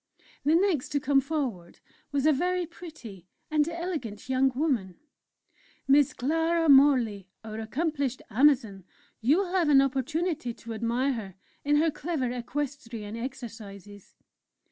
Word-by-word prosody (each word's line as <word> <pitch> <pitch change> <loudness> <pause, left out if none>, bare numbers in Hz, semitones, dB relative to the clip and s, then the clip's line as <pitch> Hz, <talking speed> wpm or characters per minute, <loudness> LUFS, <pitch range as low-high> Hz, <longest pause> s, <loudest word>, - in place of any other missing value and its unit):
The 300 +3 +3
next 350 -7 +1
to 285 - +2
come 275 0 +3
forward 260 - -4 0.3
was 285 -1 0
a 310 - +5
very 360 +4 0
pretty 305 - -11 0.2
and 305 0 +2
elegant 320 - -5
young 265 +1 +3
woman: 250 - -1 0.9
"Miss 280 0 +5
Clara 325 +5 +1
Morley, 250 -9 +4
our 220 0 -6
accomplished 275 +2 -2
'Amazon' 235 -6 +3 0.4
you 270 +9 +3
will 380 -2 -1
have 360 -5 +2
an 280 -2 +7
opportunity 275 0 -1
to 230 0 -8
admire 235 +5 0
her 200 -6 -7 0.3
in 290 +1 +2
her 315 +2 +3
clever 300 -4 -2
equestrian 245 -4 -5
exercises." 215 -5 -9
270 Hz, 130 wpm, -28 LUFS, 230-310 Hz, 0.9 s, an